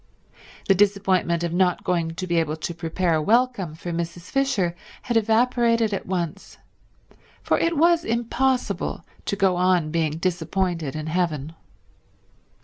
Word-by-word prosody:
The 195 - +6
disappointment 190 -3 +2
of 170 -1 -2
not 180 0 +2
going 165 -2 -1
to 185 - -4
be 175 -2 0
able 160 -2 +1
to 160 +2 -5
prepare 165 +1 -1
a 155 - +2
welcome 220 -4 +1
for 170 +2 -6
Mrs. 170 +1 -5
Fisher 250 -11 +1 0.3
had 240 - -2
evaporated 230 0 +2
at 195 - -4
once, 180 0 -4 0.9
for - - +1
it 335 -1 +1
was 335 +1 +4
impossible 235 -6 -1 0.2
to - - -1
go 190 -3 +2
on 180 -4 +2
being 160 -2 0
disappointed 175 -3 -1
in 155 0 -4
heaven. 160 -3 -1
180 Hz, 140 wpm, -24 LUFS, 165-220 Hz, 0.9 s, The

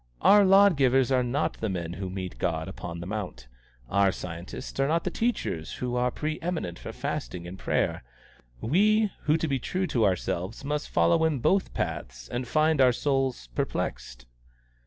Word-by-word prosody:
Our 205 0 +7
law 195 +1 +7
givers 135 -5 +3
are 130 -1 +4
not 125 +5 -1
the 110 - 0
men 85 -3 -3
who 95 +1 -5
meet 95 -1 -6
God 80 -1 -1
upon 85 -2 -7
the - - -6
mount. 90 - -5 0.4
Our 100 +5 +3
scientists 85 +10 -7
are 135 - +3
not 165 +3 +1
the 185 - -2
teachers 225 - -2
who 125 -1 -3
are 125 0 +2
pre 155 +4 -3
eminent 165 - -3
for - - -7
fasting 85 +9 -4
and 95 +2 -9
prayer. - - 0 0.6
We 210 - +3
who 155 +1 +4
to 160 - -1
be 135 -3 0
true 185 +9 -2
to 125 -9 0
ourselves 95 +4 -2
must 150 +1 -2
follow 85 - +3
in 160 -3 +2
both 190 +10 +1
paths 60 -9 -4
find 155 +3 +2
our 130 -1 +6
souls 135 - -1
perplexed." - - -3
125 Hz, 175 wpm, -27 LUFS, -, 0.6 s, Our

